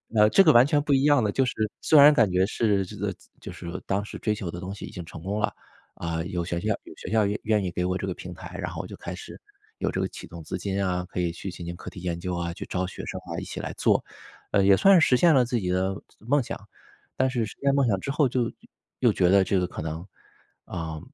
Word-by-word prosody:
呃， 105 - +6
呃， 105 - +6
这 195 - +6
个 160 - +7
完 120 -1 +7
全 145 0 +2
不 145 - -2
一 135 0 +3
样 145 -5 +5
的， 105 - +1
就 135 +3 +2
是 - - -2 0.3
虽 155 - +4
然 145 +2 +10
感 115 -8 +4
觉 90 +1 +3
是 105 -3 +1
这 105 +3 -10
个 100 0 -2 0.3
就 - - -8
是 85 +1 -7
当 100 +1 0
时 - - -8
追 110 - 0
求 100 -4 -5
的 85 - -6
东 95 +1 -5
西 100 - -7
已 - - -9
经 85 -2 -7
成 80 - -10
功 100 +4 -2
了， 105 - 0 0.4
啊， 80 -1 -3
有 90 -1 -3
学 85 0 -2
校 105 +5 -2
有 - - -12
学 - - -7
校 110 -1 +3
愿 105 +1 -2
愿 105 -2 +2
意 90 - -1
给 90 +1 -1
我 90 - 0
这 95 - -4
个 95 - -1
平 90 -1 -8
台， 90 0 -9
然 90 -2 -3
后 80 -2 -4
我 - - -9
就 - - -10
开 - - -6
始 - - -9 0.4
有 - - -1
这 - - -2
个 - - 0
启 - - -10
动 85 -1 -10
资 - - -4
金 100 0 -2
啊， 90 0 -1
可 90 - -5
以 85 -1 0
去 90 +2 -6
进 85 - -9
行 85 - -5
课 - - -9
题 90 - -10
研 85 -2 -3
究 90 0 -3
啊， 85 0 -2
去 - - -7
招 90 0 -2
学 - - -7
生 - - -5
啊， - - -5
一 - - -6
起 - - -6
来 - - -4
做， - - +3 0.5
呃， 100 - +4
也 100 - +7
算 195 - +6
实 130 -5 +4
现 170 +1 +5
了 125 - +5
自 120 0 -1
己 90 -3 -3
的 95 +1 0 0.2
梦 140 +7 +2
想， 120 - -6 0.6
但 130 0 +2
是 120 -3 -1
实 - - -9
现 140 0 +3
梦 140 -2 +3
想 100 -4 +2
之 135 - -6
后 150 0 +3
就 125 -1 0 0.5
又 - - +4
觉 90 - +3
得 100 +1 +6
这 95 - +1
个 90 - +1
可 - - -7
能， 80 +2 -5 0.6
啊， 80 -1 -5
100 Hz, 310 characters per minute, -26 LUFS, 90-120 Hz, 0.6 s, 然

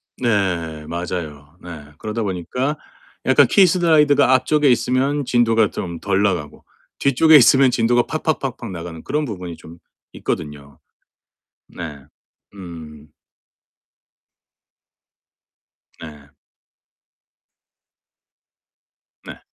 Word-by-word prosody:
네 90 -9 -2
맞아요. 80 -3 -6
네. 80 -4 -10
그러다 110 +1 -4
보니까 110 - -3 0.5
약간 - - +5
키 195 -2 +5
슬라이드가 150 -6 +3
앞쪽에 145 +2 +2
있으면 130 +3 +1
진도가 115 -3 +2
좀 85 -2 -6
덜 95 +2 0
나가고 90 -8 -2 0.4
뒤쪽에 145 +4 +4
있으면 135 -1 +6
진도가 120 +1 +2
팍팍팍팍 135 -8 -3
나가는 85 -2 -8
그런 150 +2 -2
부분이 90 - -7
좀 85 +1 -14 0.4
있거든요. 70 -3 -6 0.9
네. 75 -5 -9 0.5
음. 80 -6 -11 2.9
네. 75 -3 -12 3.0
네. - - -11
100 Hz, 195 characters per minute, -20 LUFS, 80-135 Hz, 3.0 s, 있으면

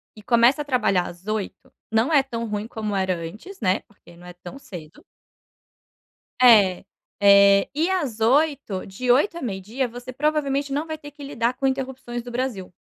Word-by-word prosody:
e 215 - -14
começa 240 +6 +4
a - - -5
trabalhar 195 -10 +1
às 175 +4 -12
8h, 215 -2 -4 0.2
não 225 +7 +2
é 280 -3 +5
tão 230 -3 -5
ruim 210 +1 -4
como 215 -3 -4
era 190 -1 0
antes, 205 - -9
né, 185 -2 +1
porque 175 -4 -20
não 175 - -15
é 180 - -10
tão 175 +5 -11
cedo 165 - -12 1.4
É, 205 -8 +6 0.4
eh, 200 0 +6
e 320 +5 0
às 290 - -2
8h, 270 -4 +1
de 245 +6 -5
8h 335 +7 +2
à - - -7
meio-dia 225 +4 -3
você 245 +2 -9
provavelmente 280 0 -1
não 295 +3 -1
vai 315 -1 -5
ter 290 -1 -11
que 290 0 -12
lidar 240 -3 -1
com 270 +2 -4
interrupções 260 -2 -3
do 245 - -9
Brasil. 235 -8 -4
235 Hz, 180 wpm, -23 LUFS, 200-275 Hz, 1.4 s, É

